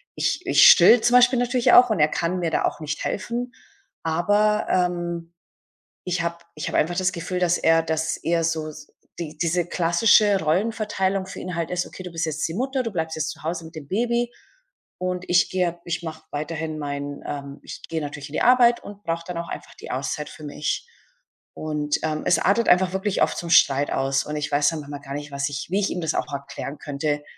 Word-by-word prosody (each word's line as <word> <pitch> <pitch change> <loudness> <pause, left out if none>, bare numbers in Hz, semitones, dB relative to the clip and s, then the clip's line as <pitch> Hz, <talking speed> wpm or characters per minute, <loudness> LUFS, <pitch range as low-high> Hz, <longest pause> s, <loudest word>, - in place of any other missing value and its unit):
ich - - -1
ich - - +7
stille 245 - +8
zum 240 +2 +3
Beispiel 250 0 +5
natürlich 245 0 +2
auch, 245 -1 +8
und 195 - 0
er 150 - +5
kann 175 +3 -1
mir 165 -2 -1
da - - +1
auch - - -2
nicht 150 0 -4
helfen. 240 +4 -3 0.5
Aber, 205 +6 +2
ähm, 175 -2 -1 0.7
ich 180 -1 -1
habe 170 0 -2 0.2
ich 150 - -5
habe - - -1
einfach 175 +3 +1
das 185 0 +2
Gefühl, 180 +2 -3
dass 175 -1 +2
er 165 0 +3
dass 160 -1 -1
er 170 0 0
so 160 -1 -1
s 150 -1 -11 0.3
die 155 -2 -6
diese 170 +1 0
klassische 195 +4 +4
Rollenverteilung 195 +2 0
für - - -8
ihn 180 0 -5
halt 165 -1 -2
ist: 180 0 -1
„Okay, 185 - -10
du 180 - -7
bist 165 0 -2
jetzt 155 -1 -2
die 165 - -6
Mutter, 265 +2 -1
du 230 - -3
bleibst 160 -3 -3
jetzt 150 -2 -1
zu - - -13
Hause 165 0 -3
mit 160 +1 -12
dem 145 -3 -8
Baby 235 +3 0 0.7
und 180 0 -3
ich 175 +1 +4
gehe 175 -2 -1
ich 170 0 -3
mache 160 -1 -7
weiterhin 155 +1 -4
mein 145 -1 -5
ähm, 140 0 -6
ich - - -9
gehe 160 -1 -2
natürlich 145 -1 -6
in 145 - -13
die - - -1
Arbeit 240 -1 +5
und 205 0 -11
brauche 165 0 -2
dann 175 -1 -5
auch 170 - -5
einfach - - -8
die - - -9
Auszeit 140 +3 -3
für 155 - -12
mich.“ 150 - -3 0.7
Und, 150 -1 -2
ähm, 155 -1 -1
es 170 - +4
artet 215 +5 +2
einfach 185 +1 +4
wirklich 190 +1 -1
oft - - 0
zum 170 - -5
Streit 140 -2 +5
aus, 135 0 +1
und 150 - -5
ich 145 0 -3
weiß 145 0 +3
dann 160 - -4
manchmal 145 0 -8
gar 140 -1 -8
nicht, 145 0 -6
was 140 +1 -2
ich 145 0 -5
wie 195 - +2
ich 195 - 0
ihm 180 - -3
das 160 0 -1
auch 150 - -2
erklären 140 +1 -6
könnte 145 0 -2
170 Hz, 220 wpm, -23 LUFS, 150-190 Hz, 0.7 s, stille